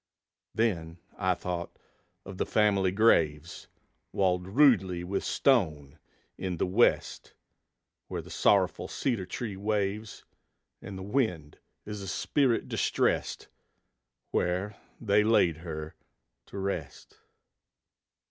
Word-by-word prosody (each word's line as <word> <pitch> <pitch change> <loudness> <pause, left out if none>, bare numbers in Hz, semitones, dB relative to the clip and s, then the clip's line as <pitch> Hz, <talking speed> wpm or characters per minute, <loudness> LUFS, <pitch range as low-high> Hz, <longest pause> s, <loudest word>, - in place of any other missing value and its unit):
Then 85 -8 -1 0.2
I 95 -2 +1
thought 85 -1 -5 0.5
of 95 -1 -9
the - - +1
family 100 -3 +2
graves, 85 -7 +2 0.4
Walled 90 -2 +1
rudely 95 -7 +3
with 95 +2 -2
stone, 75 - +1 0.4
in 90 -2 -3
the - - +1
West, 100 +6 +1 0.7
Where - - -5
the - - -13
sorrowful - - +2
cedar 115 -9 -2
tree 110 -6 -5
waves, 105 +1 -2 0.6
And 100 - -8
the 95 - -7
wind 95 - -1 0.3
is 105 -1 -6
a 100 - -7
spirit 125 +6 +1
distressed, - - 0 0.8
Where 95 +4 -1 0.2
they 105 -2 +3
laid 95 -7 +3
her 80 -2 -7 0.5
to - - -9
rest. 95 -7 -5
95 Hz, 110 wpm, -29 LUFS, 85-105 Hz, 0.8 s, rudely